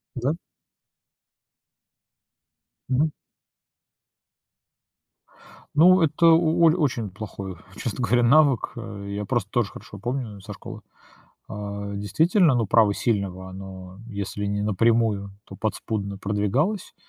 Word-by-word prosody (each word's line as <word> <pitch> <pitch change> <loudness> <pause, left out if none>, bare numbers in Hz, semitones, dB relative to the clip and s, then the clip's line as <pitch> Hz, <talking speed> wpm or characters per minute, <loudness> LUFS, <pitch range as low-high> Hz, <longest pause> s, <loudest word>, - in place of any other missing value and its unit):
Да. 130 +5 0 2.5
Мгм. 145 +4 +2 2.6
Ну, 180 +4 +7
это 160 +1 +2
у 165 0 +4
оль 160 -1 +6
очень 125 - 0
плохой, 100 -2 -7 0.2
честно 120 +2 -4
говоря, 120 0 +3
навык, 140 0 +4
э. 100 -4 -7
Я 100 +1 -3
просто 105 -2 -1
тоже 120 -4 +1
хорошо 100 - -11
помню, 120 -2 -4
э, - - -12
со - - -8
школы. - - -9 0.7
А, 100 -1 -5
действительно, 160 - +3
ну, 115 -3 +1
право 105 -1 +4
сильного, 95 -5 -2
оно 95 0 -10
если 100 -1 -4
не 100 0 -1
напрямую, 105 -1 +1
то - - -11
подспудно 105 -2 -3
продвигалось. 105 - -1
110 Hz, 110 wpm, -24 LUFS, 100-135 Hz, 2.6 s, Ну